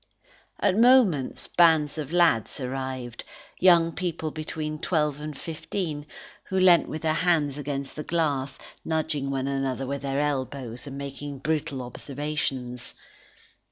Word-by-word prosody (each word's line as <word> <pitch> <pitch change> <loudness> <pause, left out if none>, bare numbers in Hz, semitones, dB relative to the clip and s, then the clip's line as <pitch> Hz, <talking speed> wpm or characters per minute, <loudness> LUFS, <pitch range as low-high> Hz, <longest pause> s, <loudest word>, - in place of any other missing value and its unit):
At 200 +1 +2
moments, 230 - +4
bands 160 -3 +4
of 150 -1 -5
lads 170 -12 +3
arrived 130 -2 -4 0.4
young 170 -2 +6
people 165 -3 -3
between 155 0 -4
twelve 150 -4 0
and 150 -2 -6
fifteen, 155 -2 -4 0.4
who 190 - -1
leant 180 -2 +6
with 155 - -5
their 155 -1 +2
hands 155 -4 +1
against 140 -1 -4
the 150 - -4
glass, 145 -6 0 0.3
nudging 155 -3 -1
one 135 -1 -1
another 135 -1 -1
with 140 +1 -3
their 140 0 -1
elbows, 130 -4 -2
and 135 0 -6
making 140 0 -6
brutal 150 -1 -2
observations. 130 -2 -4
150 Hz, 130 wpm, -26 LUFS, 135-160 Hz, 0.4 s, young